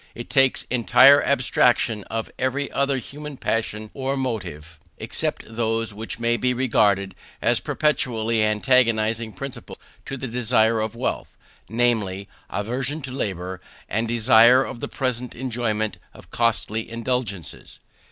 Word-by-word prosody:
It 120 Hz, -, -8 dB
makes 135 Hz, -1 st, +4 dB
entire 125 Hz, +3 st, +6 dB
abstraction 120 Hz, -4 st, +2 dB
of 115 Hz, 0 st, -4 dB
every 135 Hz, +2 st, -1 dB
other 140 Hz, 0 st, +1 dB
human 145 Hz, +3 st, -8 dB
passion 110 Hz, -2 st, -2 dB
or 135 Hz, 0 st, -2 dB
motive; 85 Hz, -, -5 dB, 0.2 s
except -, -, -2 dB
those 115 Hz, -1 st, -1 dB
which 110 Hz, 0 st, -6 dB
may 120 Hz, 0 st, +1 dB
be 125 Hz, 0 st, 0 dB
regarded 100 Hz, -6 st, +2 dB, 0.3 s
as -, -, +3 dB
perpetually 115 Hz, -7 st, 0 dB
antagonizing 110 Hz, 0 st, +2 dB
principles 135 Hz, -1 st, -8 dB, 0.3 s
to 135 Hz, -, -4 dB
the 130 Hz, -, -5 dB
desire 115 Hz, -1 st, +2 dB
of 110 Hz, +1 st, -3 dB
wealth, 120 Hz, -, -4 dB, 0.3 s
namely, 110 Hz, -4 st, 0 dB, 0.2 s
aversion 130 Hz, +8 st, -3 dB
to 130 Hz, -, -5 dB
labour, 95 Hz, -7 st, -4 dB, 0.3 s
and 115 Hz, +3 st, -1 dB
desire 120 Hz, +2 st, +6 dB
of 125 Hz, -, -7 dB
the -, -, -4 dB
present 125 Hz, -2 st, -3 dB
enjoyment 115 Hz, -4 st, -2 dB, 0.2 s
of -, -, -16 dB
costly 115 Hz, -1 st, 0 dB
indulgences. 115 Hz, -, -4 dB
115 Hz, 130 wpm, -23 LUFS, 110-130 Hz, 0.3 s, entire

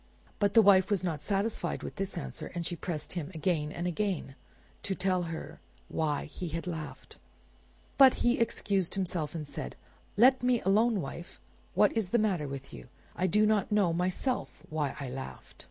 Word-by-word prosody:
But 205 Hz, -1 st, +2 dB
the 225 Hz, -, +8 dB
wife 190 Hz, -2 st, +6 dB
was 200 Hz, -4 st, +1 dB
not 160 Hz, -5 st, -2 dB
satisfied 200 Hz, +7 st, -1 dB
with -, -, -7 dB
this 195 Hz, -1 st, -2 dB
answer, -, -, -5 dB
and 170 Hz, -1 st, -2 dB
she 175 Hz, -, -2 dB
pressed 165 Hz, -2 st, -4 dB
him 175 Hz, -4 st, -4 dB
again 155 Hz, -2 st, 0 dB
and 175 Hz, -, -4 dB
again 180 Hz, -5 st, -1 dB, 0.5 s
to 195 Hz, -, -2 dB
tell 185 Hz, -1 st, +1 dB
her 160 Hz, -, -7 dB, 0.3 s
why 150 Hz, -3 st, -1 dB
he 175 Hz, +4 st, -6 dB
had 165 Hz, +2 st, -4 dB
laughed. 160 Hz, -4 st, -7 dB, 0.8 s
But 265 Hz, -2 st, +9 dB
he 240 Hz, +1 st, +3 dB
excused 200 Hz, -5 st, 0 dB
himself, 170 Hz, -5 st, -2 dB
and 155 Hz, -3 st, -4 dB
said— 65 Hz, -, -6 dB, 0.4 s
"Let 260 Hz, +4 st, +6 dB
me 250 Hz, -1 st, +3 dB
alone, 210 Hz, +2 st, +3 dB
wife! 170 Hz, +4 st, -8 dB, 0.4 s
What -, -, +5 dB
is 220 Hz, -6 st, 0 dB
the 240 Hz, -, +3 dB
matter 190 Hz, -9 st, +1 dB
with 135 Hz, 0 st, -7 dB
you? -, -, -10 dB, 0.3 s
I 185 Hz, +2 st, +1 dB
do 210 Hz, +4 st, +4 dB
not 215 Hz, -1 st, +2 dB
know 200 Hz, -5 st, +3 dB
myself 185 Hz, +9 st, -1 dB
why 150 Hz, -3 st, -1 dB
I 140 Hz, -, -4 dB
laughed." 130 Hz, +1 st, -8 dB
180 Hz, 180 wpm, -30 LUFS, 160-205 Hz, 0.8 s, But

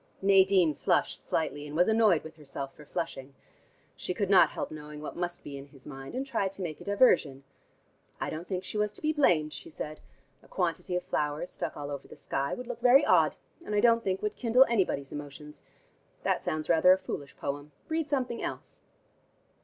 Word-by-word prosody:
Nadine 190 Hz, -4 st, +5 dB
flushed -, -, 0 dB
slightly, 145 Hz, -2 st, -1 dB
and 145 Hz, -, -7 dB
was 175 Hz, -, +4 dB
annoyed 220 Hz, -7 st, +4 dB
with 160 Hz, 0 st, -10 dB
herself 135 Hz, -2 st, -7 dB
for 150 Hz, -, -14 dB
flushing. 135 Hz, -3 st, -5 dB, 0.6 s
She 180 Hz, -, -4 dB
could 200 Hz, 0 st, -1 dB
not 190 Hz, -, +7 dB
help -, -, -5 dB
knowing 150 Hz, -1 st, -8 dB
what 150 Hz, -, -7 dB
must 175 Hz, 0 st, -3 dB
be 140 Hz, -1 st, -7 dB
in 135 Hz, -, -11 dB
his 135 Hz, -2 st, -18 dB
mind, 135 Hz, -, -8 dB
and 265 Hz, +1 st, -2 dB
tried 200 Hz, -7 st, -1 dB
to 195 Hz, -, -6 dB
make 155 Hz, -4 st, -5 dB
a -, -, -7 dB
diversion. 175 Hz, -, +3 dB, 0.8 s
"I -, -, -2 dB
don't 165 Hz, +3 st, -6 dB
think 185 Hz, -1 st, -3 dB
she 210 Hz, -, -4 dB
was 210 Hz, 0 st, 0 dB
to -, -, -14 dB
be 310 Hz, 0 st, +2 dB
blamed," 160 Hz, -, +3 dB
she -, -, -9 dB
said. 155 Hz, 0 st, -6 dB, 0.4 s
"A -, -, -20 dB
quantity 180 Hz, 0 st, -2 dB
of 180 Hz, -, -1 dB
flowers 150 Hz, +3 st, -2 dB
stuck -, -, -5 dB
all 145 Hz, 0 st, -5 dB
over 140 Hz, -, -6 dB
the -, -, -12 dB
sky 135 Hz, +1 st, -2 dB
would 250 Hz, -, -7 dB
look 240 Hz, -1 st, -6 dB
very 255 Hz, +4 st, +6 dB
odd, -, -, +4 dB, 0.3 s
and 210 Hz, -, -3 dB
I -, -, +4 dB
don't 230 Hz, 0 st, +4 dB
think 190 Hz, 0 st, -1 dB
would 210 Hz, -, -1 dB
kindle 250 Hz, +2 st, +5 dB
anybody's 185 Hz, -11 st, 0 dB
emotions. 145 Hz, +1 st, -9 dB, 0.6 s
That -, -, 0 dB
sounds 155 Hz, 0 st, -2 dB
rather 170 Hz, +2 st, +6 dB
a -, -, +2 dB
foolish 145 Hz, -6 st, -7 dB
poem. 145 Hz, +1 st, -4 dB, 0.2 s
Read 320 Hz, -1 st, -1 dB
something 255 Hz, -4 st, -1 dB
else." -, -, -6 dB
175 Hz, 205 wpm, -29 LUFS, 150-210 Hz, 0.8 s, not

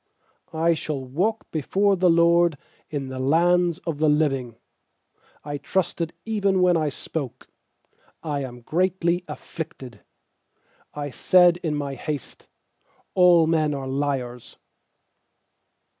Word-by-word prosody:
9I 165 Hz, +1 st, +2 dB
shall 145 Hz, -4 st, -4 dB
walk 190 Hz, -, -1 dB
before 195 Hz, +6 st, +1 dB
the 180 Hz, -1 st, +3 dB
LORD 170 Hz, -1 st, +4 dB, 0.3 s
In 140 Hz, -3 st, -4 dB
the 130 Hz, 0 st, -6 dB
lands 170 Hz, +5 st, +3 dB
of 160 Hz, -4 st, -3 dB
the 155 Hz, -1 st, +3 dB
living. 135 Hz, -6 st, 0 dB, 0.9 s
10I 145 Hz, -1 st, -5 dB
trusted 170 Hz, 0 st, -1 dB
even 200 Hz, -4 st, +1 dB
when 180 Hz, -1 st, +4 dB
I 155 Hz, -2 st, +1 dB
spoke: 135 Hz, -3 st, -6 dB, 0.8 s
'I 150 Hz, -3 st, -2 dB
am 125 Hz, -2 st, -8 dB
greatly 175 Hz, +4 st, 0 dB
afflicted.' 130 Hz, -8 st, -8 dB, 1.0 s
UI 145 Hz, -1 st, -4 dB
said 175 Hz, +4 st, +4 dB
in 160 Hz, -4 st, -2 dB
my 140 Hz, -1 st, -3 dB
haste: 145 Hz, 0 st, -6 dB, 0.7 s
'All 175 Hz, -3 st, +6 dB
men 155 Hz, -2 st, +1 dB
are 135 Hz, -1 st, -5 dB
liars.' 130 Hz, -3 st, -3 dB
155 Hz, 115 wpm, -24 LUFS, 140-175 Hz, 1.0 s, All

